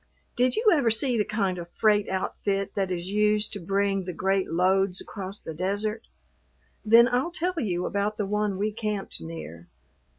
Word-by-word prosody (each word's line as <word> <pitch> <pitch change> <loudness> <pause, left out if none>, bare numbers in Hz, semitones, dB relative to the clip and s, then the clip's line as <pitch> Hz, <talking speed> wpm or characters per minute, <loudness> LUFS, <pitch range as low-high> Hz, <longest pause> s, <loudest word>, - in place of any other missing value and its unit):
Did 250 +1 +2
you 440 +1 0
ever 280 -8 +3
see 245 +3 +2
the 215 - +2
kind 195 -4 -1
of 170 0 -8
freight 210 +1 +2
outfit 195 +1 -2
that 195 -2 -1
is 180 +1 -3
used 210 +1 +2
to 205 - -4
bring 195 +1 0
the 180 - -4
great 190 +2 0
loads 185 +2 +2
across 195 0 -6
the 160 - -7
desert? 205 +6 -2 0.8
Then 230 +2 +7
I'll 255 +6 0
tell 350 0 -2
you 180 - -1
about 205 +1 -1
the 210 - -1
one 210 -1 -1
we 210 +2 0
camped 210 - -4
near. 80 +1 -8
200 Hz, 175 wpm, -26 LUFS, 185-215 Hz, 0.8 s, Then